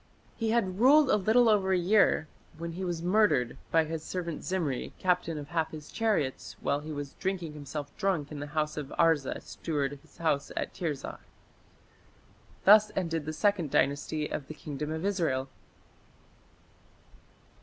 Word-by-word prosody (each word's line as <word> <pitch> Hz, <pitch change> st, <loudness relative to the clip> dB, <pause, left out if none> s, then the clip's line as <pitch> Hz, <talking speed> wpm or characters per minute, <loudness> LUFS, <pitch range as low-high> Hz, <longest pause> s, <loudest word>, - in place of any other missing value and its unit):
He 225 Hz, -1 st, -1 dB
had 195 Hz, -5 st, 0 dB
ruled 275 Hz, +3 st, +6 dB
a -, -, +5 dB
little 220 Hz, +4 st, +4 dB
over 200 Hz, -3 st, +3 dB
a -, -, +4 dB
year 180 Hz, -3 st, +3 dB, 0.3 s
when 170 Hz, +1 st, -5 dB
he 180 Hz, +3 st, -5 dB
was 175 Hz, -2 st, -3 dB
murdered 180 Hz, -, +3 dB
by 165 Hz, -1 st, +3 dB
"his 160 Hz, 0 st, -4 dB
servant 170 Hz, -3 st, -4 dB
Zimri, 165 Hz, -9 st, -2 dB
captain 180 Hz, -3 st, 0 dB
of 145 Hz, -1 st, -7 dB
half 160 Hz, -2 st, 0 dB
his 150 Hz, -1 st, -10 dB
chariots", 210 Hz, -, -1 dB
while 140 Hz, -, 0 dB
he 155 Hz, +1 st, -7 dB
was 145 Hz, -2 st, -5 dB
"drinking 185 Hz, -5 st, -2 dB
himself 145 Hz, 0 st, -7 dB
drunk 185 Hz, -8 st, 0 dB
in 150 Hz, -, -6 dB
the 145 Hz, -, -5 dB
house 150 Hz, 0 st, 0 dB
of 150 Hz, -2 st, -3 dB
Arza 160 Hz, -5 st, +2 dB
steward 145 Hz, -4 st, -2 dB
of 140 Hz, -, -11 dB
his -, -, -23 dB
house 150 Hz, -4 st, 0 dB
in -, -, -2 dB
Tirzah". 150 Hz, -6 st, -4 dB, 1.5 s
Thus 215 Hz, +1 st, +7 dB
ended 165 Hz, -4 st, -2 dB
the -, -, -1 dB
Second 175 Hz, -1 st, +1 dB
Dynasty 145 Hz, +3 st, +1 dB
of 140 Hz, -, -5 dB
the 155 Hz, -, -8 dB
Kingdom 150 Hz, 0 st, -5 dB
of 160 Hz, +3 st, -3 dB
Israel. 160 Hz, -10 st, 0 dB
165 Hz, 165 wpm, -29 LUFS, 150-190 Hz, 1.5 s, Thus